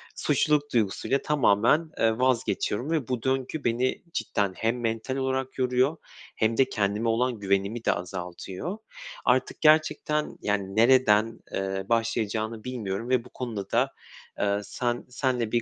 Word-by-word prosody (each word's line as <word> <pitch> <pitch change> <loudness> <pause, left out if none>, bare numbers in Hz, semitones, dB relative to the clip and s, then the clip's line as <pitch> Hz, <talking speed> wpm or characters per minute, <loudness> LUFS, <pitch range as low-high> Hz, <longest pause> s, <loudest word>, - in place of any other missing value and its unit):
suçluluk 145 -1 +1
duygusuyla 115 +4 +1
tamamen, 150 +3 +3
eee, 110 0 +2
vazgeçiyorum 125 +1 0
ve 155 -7 0
bu 125 -3 -2
döngü 135 +3 -1
beni 120 +2 0
cidden 100 - -1
hem 115 +2 0
mental 115 +3 -2
olarak 130 0 -2
yoruyor 130 +4 +2 0.4
hem 110 +1 +1
de 135 -1 +4
kendime 105 0 0
olan 120 +1 0
güvenimi 100 +3 0
de - - +4
azaltıyor. 90 - -5 0.5
Artık - - +1
gerçekten, 155 -1 +2
yani, 100 -2 -1
nereden, 115 -2 +4
eee, 95 0 -2
başlayacağını 110 -1 -1
bilmiyorum 115 -3 -4
ve 125 -2 +2
bu - - -13
konuda 110 -6 -5
da, - - +2 0.5
eee, 100 0 +1
sen 120 +3 -2
seninle 125 -3 -1
bir 120 - +2
115 Hz, 140 wpm, -27 LUFS, 105-130 Hz, 0.5 s, de